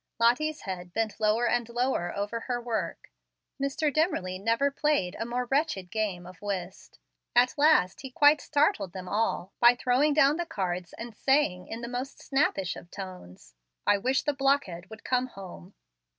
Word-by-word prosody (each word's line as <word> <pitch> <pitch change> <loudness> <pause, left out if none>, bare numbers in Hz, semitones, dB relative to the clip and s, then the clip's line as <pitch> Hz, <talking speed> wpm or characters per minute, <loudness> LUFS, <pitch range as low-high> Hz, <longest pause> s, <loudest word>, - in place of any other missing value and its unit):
Lottie's 280 +7 +2
head 180 -2 -6
bent 225 0 -2
lower 220 +3 +2
and 240 0 0
lower 240 -7 0
over 205 +3 -2
her 245 +1 -3
work. 235 -2 -4 0.5
Mr. 275 +2 0
Dimmerly 190 - 0
never 230 +7 +1
played 280 -11 0
a 225 - -2
more 250 +1 -2
wretched 270 - 0
game 205 -5 -2
of 180 +1 -13
whist. 190 -2 -5 0.4
At 245 +1 +5
last 295 - +3
he 265 - -7
quite 290 +3 +5
startled 285 - +1
them 185 -1 -7
all 205 -2 -1
by 240 0 +7
throwing 260 +4 +2
down 295 0 +5
the 345 -1 -3
cards 180 - -3
and 230 -1 -8
saying, 265 -11 +1
in 225 +1 -6
the 235 - -5
most 250 +3 -5
snappish 235 - 0
of 175 - -11
tones, 180 - -10 0.3
"I 205 0 +4
wish 260 +5 +1
the 295 - 0
blockhead 270 -11 0
would 220 0 -11
come 255 0 +1
home." 195 -3 -11
230 Hz, 170 wpm, -28 LUFS, 190-275 Hz, 0.5 s, by